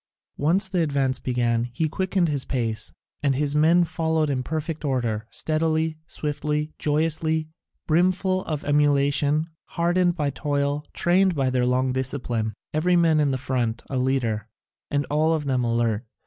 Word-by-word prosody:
Once 180 +7 +3
the 185 -2 0
advance 140 -4 0
began 120 -2 0
he 160 +4 +1
quickened 185 +2 0
the 145 -4 -1
pace, 115 -5 -1 0.3
and 140 -2 +2
his 145 +1 +1
men 165 +4 +5
followed 160 -2 0
in 130 -2 -1
perfect 155 +3 -4
order, 120 -6 -1
steadily, 160 0 0
swiftly, 150 0 -2
joyously, 155 +1 0 0.4
brimful 185 +3 +2
of 150 -3 -3
emulation, 145 +2 +2 0.3
hardened 175 +1 +2
by 150 -4 -1
toil, 145 +1 -1
trained 185 +1 +2
by 135 -3 +1
their 125 -1 +1
long 130 +1 +1
discipline, 125 -5 -2 0.2
every 175 +4 +2
man 165 -3 +4
in 145 -2 +3
the 130 - 0
front 120 -3 -2
a 135 - -1
leader, 115 -5 0 0.4
and 145 0 0
all 155 +2 +3
of 150 -2 -3
them 130 -2 +1
alert. 115 -2 0
150 Hz, 150 wpm, -24 LUFS, 130-160 Hz, 0.4 s, men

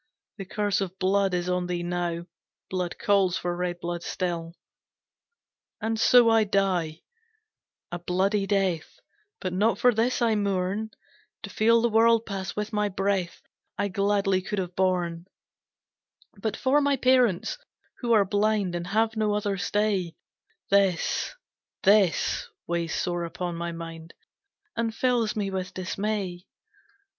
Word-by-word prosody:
The 195 - -6
curse 205 +1 0
of 190 -1 -4
blood 195 0 +2
is 175 0 -2
on 180 0 0
thee 175 -1 -2
now, 175 -1 -2 0.5
Blood 180 -2 -2
calls 195 -3 +2
for 175 0 -2
red 175 0 -3
blood 175 0 -4
still. 170 -2 -3 1.2
"And 220 0 -2
so 245 +1 +6
I 225 -1 +5
die 185 -6 0 0.9
a 175 - -4
bloody 195 +3 0
death 190 -5 -1 0.4
But 185 - -3
not 205 +2 +2
for 245 +2 +4
this 230 +3 +1
I 235 -2 +3
mourn, 200 +1 -1 0.5
To - - -7
feel 230 +1 +3
the 235 - +3
world 230 +1 +4
pass 190 -3 -5
with 210 +1 -3
my 210 -1 +1
breath 195 -2 -1 0.3
I 200 0 0
gladly 195 0 +1
could 205 +2 -4
have 180 -2 -3
borne, 180 -2 0 1.1
"But 215 +1 -3
for 265 +3 +3
my 285 -1 +2
parents, 255 - +2 0.4
who 240 -2 -1
are 210 -3 +5
blind, 205 -1 +1
And 175 0 -3
have 225 +3 +1
no 215 -1 +1
other 205 -1 -1
stay, 200 -3 0 0.6
This, 195 - +2 0.5
this, 200 - +3 0.2
weighs 170 -1 -2
sore 175 -1 -1
upon 175 +1 -4
my 170 0 -3
mind 165 -1 -9 0.6
And 230 -1 -1
fills 245 -4 +1
me 200 -2 -2
with 190 -1 -4
dismay. 185 -1 -3
195 Hz, 140 wpm, -26 LUFS, 175-215 Hz, 1.2 s, so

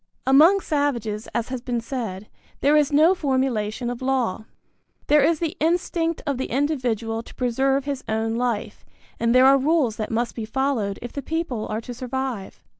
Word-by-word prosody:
Among 320 +9 +6
savages, 235 - -1
as 235 0 -1
has 255 -2 -4
been 245 -1 -2
said, 225 -5 -5 0.3
there 290 +2 +4
is 300 -2 +3
no 310 +5 +5
formulation 260 - -1
of 245 - -7
law. 250 -5 -1 0.6
There 295 -1 +4
is 320 +2 +3
the 325 -1 -3
instinct 330 0 0
of 280 -4 -1
the 260 - -2
individual 240 -5 -1
to - - -15
preserve 265 +2 +1
his 280 -2 -3
own 220 +1 0
life, 235 -2 -2 0.4
and 235 +1 +2
there 255 +1 +7
are 275 +1 +6
rules 280 -6 +1
that 215 - -3
must 235 +1 -1
be 230 - -5
followed 225 -4 -1
if 240 - -7
the 280 - -4
people 275 -7 -3
are 215 +1 -3
to 245 - -7
survive. 250 -4 -5
255 Hz, 180 wpm, -23 LUFS, 230-285 Hz, 0.6 s, there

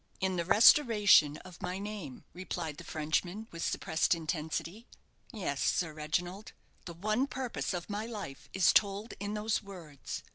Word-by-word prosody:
"In 190 -1 0
the 170 -1 -1
restoration 210 - +6
of 180 -2 -12
my 180 - -3
name," 200 -9 -7
replied 170 -4 -5
the - - -9
Frenchman, 175 +7 -2
with 165 0 -5
suppressed 160 +2 +1
intensity. 165 +6 -4 0.4
"Yes, 185 - -3
Sir 165 -3 +1
Reginald, 175 +6 -3 0.3
the 170 - -7
one 215 +9 0
purpose 260 -3 -3
of 175 -2 -4
my 210 +2 -3
life 205 -12 -7
is 190 -1 +4
told 205 +2 +2
in 205 +1 -3
those 215 +1 0
words. 175 -9 -8
185 Hz, 150 wpm, -31 LUFS, 165-210 Hz, 0.4 s, restoration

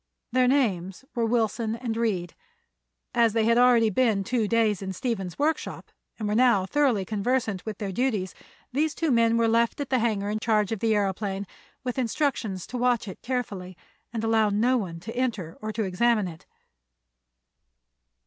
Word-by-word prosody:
Their 255 +1 +3
names 205 -6 0
were 235 -2 0
Wilson 225 -1 0
and 235 -1 -3
Reed. 200 -7 -1 0.8
As 230 -2 +3
they 225 -1 +2
had 230 +1 +4
already 240 -3 +5
been 215 -2 +2
two 230 +1 0
days 220 -3 +2
in 190 -1 -4
Stephen's 195 -4 -3
workshop 310 +3 -2 0.3
and 215 - -3
were 210 - 0
now 235 -5 +4
thoroughly 250 -4 +1
conversant 215 -1 -1
with 215 - -4
their 200 -2 -4
duties, 210 -4 -1 0.4
these 305 +3 +1
two 325 -3 0
men 230 -1 +3
were 230 0 +3
left 230 +3 +2
at 280 -2 -4
the 260 - +3
hangar 210 -3 0
in 215 - -1
charge 215 -2 +1
of 225 - -2
the 225 +1 +2
aëroplane, 200 -1 -1 0.4
with 250 0 -2
instructions 230 - -1
to 250 - -5
watch 240 -2 +1
it 190 - -8
carefully 200 -8 -4 0.3
and 225 -2 -3
allow 225 -1 +3
no 230 +5 +2
one 180 -8 -3
to 225 +6 -7
enter 220 -10 -2
or 215 0 -3
to 220 +1 -2
examine 210 +2 +2
it. 165 -2 -11
225 Hz, 175 wpm, -26 LUFS, 200-245 Hz, 0.8 s, already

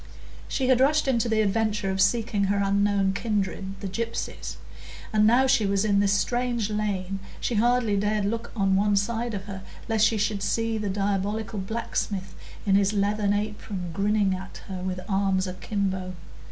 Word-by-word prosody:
She 260 - -1
had 255 -1 +4
rushed 295 +3 +3
into 235 -3 +1
the 220 -1 +3
adventure 210 -1 0
of 190 0 0
seeking 220 -3 +2
her 200 +1 +1
unknown 200 -1 +2
kindred, 195 -2 -2
the 200 - -3
gypsies; 230 +5 -4 0.6
and 215 0 +5
now 245 +4 +5
she 260 -6 +3
was 200 +1 +1
in 200 -2 +3
this 200 0 +3
strange 240 0 0
lane, 195 -2 -2 0.2
she - - -1
hardly 235 -1 +2
dared 205 +1 +1
look 230 +3 -3
on 195 -3 +2
one 205 +1 +3
side 225 +3 -1
of 195 0 -5
her, 195 -2 -7 0.3
lest 220 -1 +4
she 225 - 0
should 210 -1 0
see 225 +1 0
the 210 -1 -2
diabolical 205 +2 -1
blacksmith 195 -2 -3 0.3
in 195 - +2
his 200 +1 +3
leathern 205 0 +1
apron 205 -3 -3
grinning 200 0 +2
at 185 +1 -7
her 185 -2 -5
with 185 0 -3
arms 195 -1 +1
akimbo. 190 -1 -3
205 Hz, 170 wpm, -26 LUFS, 195-220 Hz, 0.6 s, and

